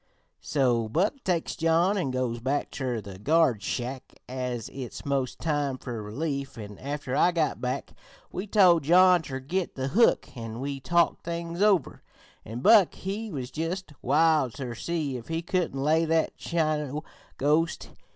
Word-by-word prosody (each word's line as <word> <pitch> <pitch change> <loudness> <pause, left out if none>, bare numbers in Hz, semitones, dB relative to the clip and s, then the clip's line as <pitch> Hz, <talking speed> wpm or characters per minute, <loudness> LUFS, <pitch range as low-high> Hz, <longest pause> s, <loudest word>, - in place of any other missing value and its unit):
"So 120 -6 +1
Buck 205 - 0
takes 175 -3 -1
John 165 +4 +2
an' 180 -9 -1
goes 130 -2 -2
back 135 +4 -1
ter 125 -4 -3
the 95 -2 -10
guard 145 -3 +3
shack, 125 +4 -5
as 125 -3 -4
it's 130 -3 -7
most 135 -2 -1
time 145 -4 -1
fer 120 -4 -6
relief, 140 +6 -4
an' 105 -2 -9
after 140 -1 -4
I 180 - +4
got 165 -3 0
back 125 0 -3 0.4
we 190 +3 -4
told 185 -5 +5
John 180 +4 +6
ter 135 -4 -5
git 175 +7 -3
the 130 0 -2
hook, 230 - +3
an' 115 -1 -6
we 140 +1 -3
talked 170 +4 +1
things 170 +1 -4
over, 200 -8 +2 0.4
an' 115 +3 -6
Buck 205 - +6
he 205 +4 -4
was 130 -6 -5
just 165 +1 -4
wild 150 -2 +3
ter 130 -4 -5
see 150 +1 -2
if 115 - -10
he 165 +1 -2
couldn't 175 -6 -1
lay 155 +4 +3
that 160 0 +1
Chino 155 -3 -1 0.3
ghost. 155 +4 +1
145 Hz, 160 wpm, -27 LUFS, 130-170 Hz, 0.4 s, John